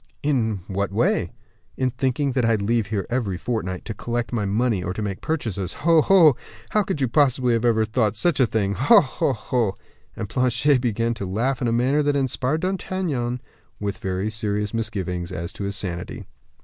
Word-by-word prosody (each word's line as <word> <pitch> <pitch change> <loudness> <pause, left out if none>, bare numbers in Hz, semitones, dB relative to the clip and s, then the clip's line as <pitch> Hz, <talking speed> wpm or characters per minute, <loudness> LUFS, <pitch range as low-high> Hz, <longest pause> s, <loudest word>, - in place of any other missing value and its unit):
"In 115 -9 0
what 100 0 -2
way?" - - +1 0.5
"In 130 -1 +1
thinking 135 +2 0
that 130 -1 0
I 115 0 +3
leave 110 +1 0
here 100 -2 -2
every 110 -7 -1
fortnight, 95 -4 -3
to 110 - -4
collect 120 +2 -3
my 110 -4 0
money 110 0 +1
or 90 0 -3
to 110 - -3
make 100 -2 -4
purchases. 110 - -2
Ho, 165 -2 +6
ho! 165 -6 +6 0.4
how 215 - +3
could 190 -7 -3
you 130 - +3
possibly 130 -2 +3
have 115 - +1 0.3
thought 110 -2 +1
such 155 +7 +1
a 130 - +5
thing? 100 -3 0
Ho, 215 - +6
ho, 140 -4 0
ho!" 115 -6 -1 0.4
And 110 - -4
Planchet 125 +3 +2
began 115 -1 0
to 100 -4 -5
laugh 120 +7 -1
in 120 - +1
a - - +1
manner 130 +5 +2
that 145 -1 +1
inspired 135 +2 0
D'Artagnan 175 -10 -2 0.4
with 100 -1 -3
very 95 +3 -2
serious 105 -1 -2
misgivings 95 -6 -3
as 85 -1 -5
to 100 - -5
his 100 0 -2
sanity. 90 -4 -4
115 Hz, 190 wpm, -23 LUFS, 100-135 Hz, 0.5 s, Ho